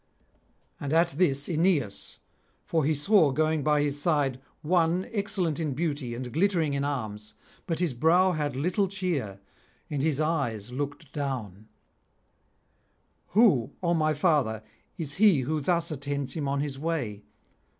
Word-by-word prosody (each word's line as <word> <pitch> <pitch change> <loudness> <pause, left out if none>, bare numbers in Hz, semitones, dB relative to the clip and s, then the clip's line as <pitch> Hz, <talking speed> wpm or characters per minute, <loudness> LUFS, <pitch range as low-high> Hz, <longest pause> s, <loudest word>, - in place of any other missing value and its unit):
And 145 +1 -3
at 170 +1 +4
this 140 -3 +1
Aeneas, 160 - 0 0.5
for 160 -2 +1
he 155 +1 +2
saw 165 +2 +4
going 155 +2 +1
by 150 0 +3
his 145 0 -1
side 145 -5 +1 0.2
one 175 +2 +2
excellent 195 -7 -1
in 150 -5 -2
beauty 145 -6 -2
and 125 0 -6
glittering 165 -3 +1
in 140 0 -1
arms, 110 -7 -4 0.3
but 165 -3 -1
his 170 -5 0
brow 170 +9 +4
had 150 -5 -2
little 180 +8 +1
cheer, 170 - -3 0.5
and 145 -2 -1
his 150 -1 +1
eyes 135 -9 -1
looked 145 +2 -5
down: 115 -8 -4 1.6
'Who, 190 - +3
O 170 -1 +2
my 155 -2 +1
father, 140 - +1 0.3
is 155 -5 -4
he 195 -11 +6
who 150 +4 -1
thus 170 +2 0
attends 140 -1 -3
him 150 -4 -3
on 140 0 0
his 140 -2 -4
way? 145 -10 -2
150 Hz, 145 wpm, -27 LUFS, 135-170 Hz, 1.6 s, he